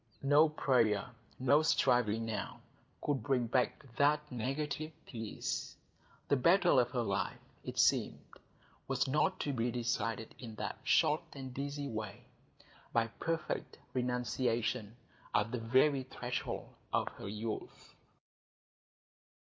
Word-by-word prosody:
No 145 +3 +6
prayer, 115 -9 +2 0.3
no 140 +4 +4
striving 120 -8 +3
now, 105 -3 -4 0.5
would 145 -4 +1
bring 125 +1 +1
back 125 +4 0
that 150 +1 +3
negative 145 +5 -2
peace; 115 -3 -4 0.5
the 140 - +4
battle 175 +2 +5
of 120 -1 +2
her 125 -2 -1
life, 100 -3 -1 0.3
it - - -6
seemed, - - +3 0.7
was - - +1
not 150 +8 +2
to 145 - -1
be 120 -1 0
decided 115 -2 -2
in 115 -4 -8
that - - -4
short - - +4
and 130 -2 -7
easy 140 0 -3
way,—by 110 +1 -5
perfect 165 -1 -2 0.2
renunciation 125 -2 0 0.4
at 105 +2 +2
the 125 - -2
very 130 +5 +3
threshold 125 -1 -4 0.2
of - - +1
her - - -9
youth. 110 +2 -5
125 Hz, 115 wpm, -34 LUFS, 115-140 Hz, 0.7 s, No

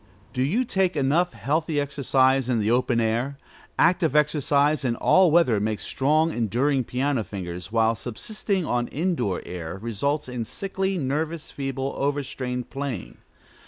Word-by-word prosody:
Do 125 - -1
you 200 - +1
take 190 -5 +1
enough 145 +5 +2
healthy 145 +7 -1
exercise 135 -2 +2
in 125 - +2
the 105 +1 +1
open 125 -1 +2
air? 120 +5 0 0.4
Active 170 -4 +3
exercise, 150 0 +2
in 120 -3 0
all 185 +8 +4
weather, 155 -10 +4
makes 105 0 -2
strong, 155 +4 +2
enduring 125 +3 +1
piano 130 0 0
fingers, 90 -2 -6
while 115 0 +3
subsisting 190 - -3
on 120 -3 0
indoor 145 - -1
air 90 0 -6
results 115 +8 -2
in 125 -2 -3
sickly, 190 - -3
nervous, 155 +2 -2
feeble, 135 -1 -3
over 145 +1 0
strained 125 -2 -5
playing. 135 -7 -5
135 Hz, 145 wpm, -25 LUFS, 120-155 Hz, 0.4 s, all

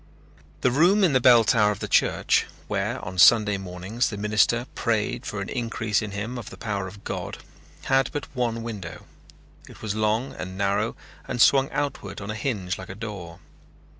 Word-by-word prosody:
The 125 - +3
room 175 +10 +4
in 170 -6 +4
the 130 - +3
bell 120 -2 +7
tower 110 -2 +3
of 105 - -2
the - - -4
church, - - +2 0.2
where - - -2
on 90 +1 -5
Sunday 105 0 +6
mornings 95 +5 -2
the 105 - -6
minister 110 +3 +2
prayed 110 -3 -1
for 105 - -4
an 100 - -5
increase 115 -3 -1
in 105 - -4
him 105 +5 -4
of 115 - -8
the - - -11
power 100 -4 -3
of 100 +3 -12
God, - - -5 0.5
had 135 -1 +2
but 145 - -4
one 115 -2 -1
window. 100 -8 -7 0.6
It - - -14
was 105 -2 -2
long 110 +4 0
and 95 0 -7
narrow 100 +3 0 0.3
and 125 - -4
swung 135 +3 +5
outward 135 -9 -3
on 100 +1 -5
a - - -5
hinge 105 -8 -2
like 95 - -9
a 95 - -7
door. 100 -6 -8
110 Hz, 190 wpm, -25 LUFS, 100-120 Hz, 0.6 s, bell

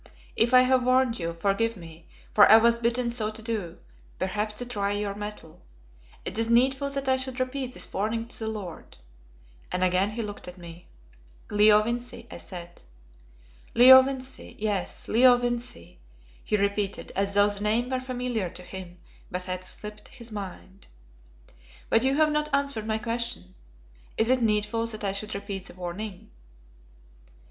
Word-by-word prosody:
If 230 +2 +3
I 255 0 +8
have 255 0 +3
warned 255 -2 +2
you, 170 -1 -2
forgive 200 +6 0
me, 165 -1 -13 0.3
for 205 - +7
I 220 - +10
was 235 +1 +4
bidden 235 +1 +1
so 220 -3 -1
to 215 - -9
do, 215 -7 -4 0.4
perhaps 210 +2 -2
to 245 - -2
try 205 -4 -2
your 205 -1 -2
mettle. 205 -6 -8 0.6
Is 225 +4 -1
it - - -1
needful 265 +4 +3
that 275 -1 -4
I 260 0 +3
should 260 0 -3
repeat 255 0 -3
this - - -6
warning 225 +3 -1
to 250 - -7
the 220 - -3
lord 200 -6 -8 0.4
" - - -27
and 180 - 0
again 185 +2 +2
he 225 +2 -4
looked 205 -3 -8
at 180 +1 -9
me. 170 -1 -12 0.6
"Leo 210 0 +6
Vincey," 240 +2 -4
I - - -8
said. 175 -2 -9 0.9
"Leo 260 +2 +10
Vincey, 265 0 -6
yes, 205 -3 -2
Leo 245 +2 +6
Vincey," 240 - -4 0.4
he 210 - 0
repeated, 200 0 -1
as 200 +1 0
though 205 0 +5
the 205 -1 -4
name 225 +5 0
were 260 - 0
familiar 250 -6 -3
to 180 - -11
him 180 -1 -9 0.3
but 180 0 -4
had 185 0 -4
slipped 210 +3 -9
his 235 -3 -11
mind. 195 -1 -8 1.0
"But 225 - +5
you 265 +2 +2
have 305 0 +3
not 300 0 0
answered 280 -6 -2
my 220 0 0
question. 230 - -3 0.6
Is 225 +1 +2
it 255 -1 +3
needful 220 +1 +1
that 215 -2 -5
I 200 - 0
should 210 +2 -4
repeat 200 -1 -5
the - - -11
warning?" 185 +2 -7
215 Hz, 170 wpm, -27 LUFS, 195-245 Hz, 1.0 s, I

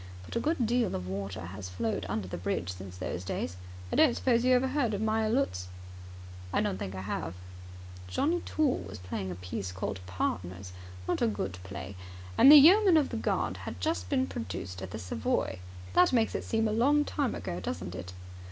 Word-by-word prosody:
But - - -8
a - - +2
good 295 -2 +1
deal 235 -2 +1
of 90 0 -4
water 95 -1 -4
has 95 +1 -7
flowed 110 +5 -2
under 105 -2 -2
the - - -5
bridge 90 0 -2
since 90 0 -9
those 90 -1 -4
days. 90 -1 -3 0.4
I - - 0
don't 300 -7 +5
suppose 240 -2 +2
you 255 0 +5
have 250 - +3
ever 265 0 -1
heard 245 -8 +1
of 200 - -3
Meyer 220 0 +1
Lutz?" 220 - 0 0.8
"I - - +2
don't 95 - -1
think 95 0 -4
I 95 - -4
have." 90 -3 -4 0.7
"Johnnie 320 - +1
Toole 300 -4 +1
was 100 +1 -8
playing 90 +1 -4
a 90 - -4
piece 90 +1 -5
called 95 +1 -4
Partners. 90 0 -3 0.3
Not - - 0
a - - +4
good 95 -4 -3
play. 95 0 -7 0.4
And 275 - +9
the - - +12
Yeoman 360 +5 +8
of 295 - +2
the - - -4
Guard - - 0
had - - -7
just 320 +2 -1
been 265 -2 +2
produced 95 - -5
at 95 - -5
the - - -5
Savoy. 90 0 -1 0.3
That 180 - +5
makes 230 -3 +2
it - - -3
seem 225 0 +1
a - - 0
long 285 +6 +4
time 280 -5 -1
ago, 85 - -4
doesn't 85 -1 -4
it? 90 0 -7
100 Hz, 205 wpm, -30 LUFS, -, 0.8 s, the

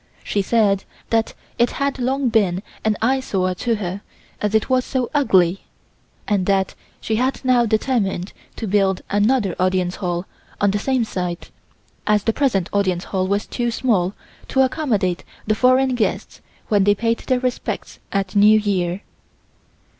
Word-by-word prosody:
She 205 - 0
said 200 -2 +2 0.3
that 225 -1 +1 0.2
it 240 - +4
had 280 -1 -1
long 260 +1 0
been 195 -4 +1 0.2
an 215 -1 +1
eyesore 225 -8 +1
to 230 +5 -1
her 195 -1 -4 0.4
as 210 +1 0
it 220 - +2
was 255 -1 +2
so 255 -2 -2
ugly, 190 - +3 0.6
and 200 -3 +1
that 195 -1 +1 0.3
she 220 - -1
had 260 +2 -1
now 245 -2 +4
determined 215 -5 0 0.2
to 225 - -5
build 195 -2 +1
another 205 -1 +2
Audience 185 -1 +1
Hall 175 -2 -2 0.3
on 205 -1 +3
the 205 - -1
same 260 +2 +1
site, 180 -5 -4 0.6
as 210 -2 +3
the 225 - +1
present 220 -11 +1
Audience 190 -3 +1
Hall 185 -1 -1
was 200 +2 0
too 240 -1 -2
small 210 -6 0 0.3
to 265 - +2
accommodate 225 - 0 0.2
the 215 - +2
foreign 255 +3 +3
guests 240 -3 -2 0.3
when 205 -2 +3
they 205 +1 +4
paid 230 +2 0
their 255 -2 0
respects 250 -1 -3
at 195 -1 -2
New 210 +2 +7
Year. 190 -3 -1
210 Hz, 155 wpm, -21 LUFS, 190-245 Hz, 0.6 s, New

